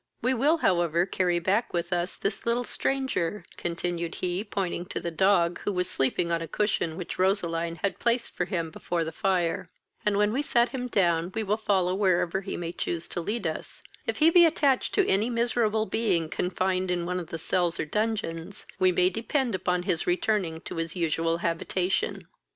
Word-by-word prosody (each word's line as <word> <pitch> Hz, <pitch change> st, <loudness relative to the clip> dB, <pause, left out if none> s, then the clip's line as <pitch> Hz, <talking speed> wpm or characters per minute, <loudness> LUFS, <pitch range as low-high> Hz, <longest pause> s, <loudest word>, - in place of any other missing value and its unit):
We 255 Hz, +2 st, +1 dB
will, 285 Hz, +7 st, +3 dB
however, 175 Hz, -, +2 dB
carry 180 Hz, -2 st, +1 dB
back 195 Hz, +7 st, 0 dB
with 175 Hz, +1 st, -1 dB
us 175 Hz, +1 st, -1 dB
this 200 Hz, +3 st, -3 dB
little 235 Hz, +1 st, +2 dB
stranger, 255 Hz, -9 st, -1 dB
(continued 170 Hz, 0 st, -3 dB
he, 180 Hz, +2 st, -2 dB
pointing 185 Hz, -4 st, -3 dB
to -, -, -4 dB
the 170 Hz, -, -4 dB
dog, 175 Hz, 0 st, +3 dB
who -, -, -2 dB
was 180 Hz, -2 st, -1 dB
sleeping 170 Hz, 0 st, 0 dB
on 165 Hz, 0 st, +1 dB
a 165 Hz, -, -4 dB
cushion 175 Hz, -4 st, 0 dB
which 180 Hz, -1 st, -6 dB
Roseline 170 Hz, -3 st, +1 dB
had 200 Hz, -, 0 dB
placed 235 Hz, 0 st, 0 dB
for 180 Hz, -, -1 dB
him 170 Hz, -4 st, -2 dB
before 170 Hz, +1 st, -2 dB
the 160 Hz, -, -4 dB
fire,) 175 Hz, -2 st, 0 dB, 0.3 s
and, 210 Hz, -1 st, +2 dB
when 210 Hz, +1 st, +3 dB
we 270 Hz, -, +1 dB
set 240 Hz, -4 st, +2 dB
him 250 Hz, -2 st, -4 dB
down, 175 Hz, -5 st, +1 dB
we 220 Hz, -, 0 dB
will 205 Hz, 0 st, +1 dB
follow 190 Hz, -4 st, +1 dB
wherever 190 Hz, -2 st, +1 dB
he 195 Hz, -, -5 dB
may 170 Hz, -1 st, -4 dB
choose 170 Hz, -1 st, -3 dB
to 175 Hz, -, -3 dB
lead 210 Hz, +4 st, -3 dB
us: 160 Hz, -, -4 dB, 0.2 s
If -, -, -1 dB
he 320 Hz, +2 st, +5 dB
be 350 Hz, 0 st, +8 dB
attached 290 Hz, -5 st, +2 dB
to 400 Hz, -, +4 dB
any 205 Hz, +5 st, +2 dB
miserable 230 Hz, -2 st, +1 dB
being 190 Hz, -9 st, 0 dB
confined 185 Hz, +1 st, -1 dB
in 175 Hz, -1 st, 0 dB
one 180 Hz, +1 st, -1 dB
of 170 Hz, -, -6 dB
the 165 Hz, -, -5 dB
cells 175 Hz, +1 st, 0 dB
or -, -, 0 dB
dungeons, 200 Hz, -2 st, -2 dB
we 185 Hz, 0 st, +5 dB
may 180 Hz, +1 st, +3 dB
depend 235 Hz, +4 st, -1 dB
upon 180 Hz, -1 st, 0 dB
his 170 Hz, -2 st, -1 dB
returning 175 Hz, -2 st, 0 dB
to -, -, -7 dB
his 165 Hz, +1 st, -3 dB
usual 165 Hz, -1 st, +1 dB
habitation." 175 Hz, +2 st, -1 dB
185 Hz, 195 wpm, -27 LUFS, 170-215 Hz, 0.3 s, be